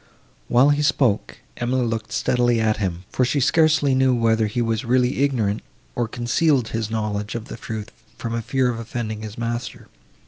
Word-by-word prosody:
While 130 +4 +5
he 145 0 +1
spoke, 140 -8 +1 0.2
Emily 125 +1 0
looked 115 -1 -3
steadily 120 -1 +2
at 110 -1 +1
him, 90 -4 -3
for 130 - +1
she 130 +4 +1
scarcely 155 0 +3
knew 130 -1 +3
whether 115 -2 +2
he 105 +4 -3
was 115 -2 0
really 125 +2 +1
ignorant, 115 -7 +1 0.3
or 120 -1 -1
concealed 120 +2 +1
his 110 -1 -2
knowledge 105 -1 -2
of 115 -2 -4
the - - -6
truth 110 -1 -6 0.3
from 115 - -4
a 115 - -1
fear 130 +2 +1
of 115 - -5
offending 110 -2 -4
his 110 -1 -8
master. 120 +1 -4
120 Hz, 180 wpm, -22 LUFS, 110-130 Hz, 0.3 s, While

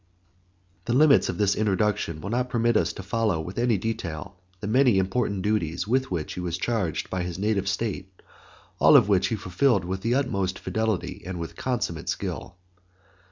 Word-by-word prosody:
The 120 - 0
limits 145 0 +5
of 85 - -3
this 100 -1 +3
introduction 105 -5 0
will 100 - -5
not 125 +1 0
permit 120 -1 +1
us 85 -3 +2
to 95 - -8
follow 105 -3 0
with 90 +7 -5
any 120 -3 +2
detail 100 -3 -4 0.2
the 100 - -6
many 125 0 +4
important 95 0 0
duties 90 -4 -1
with 130 +3 +1
which 85 -4 -3
he - - -6
was 90 -1 -2
charged 95 -6 -2
by 95 - -1
his 90 -1 -4
native 100 -1 0
state, 95 -2 -3 0.7
all - - +7
of - - +4
which 95 -1 +3
he 110 - -1
fulfilled 100 +1 +1
with 95 +1 -3
the 115 +4 +1
utmost 100 -9 0
fidelity 110 -3 -2
and 90 0 -5
with 85 - -6
consummate 110 -10 -2
skill. - - -4
100 Hz, 180 wpm, -25 LUFS, 90-115 Hz, 0.7 s, all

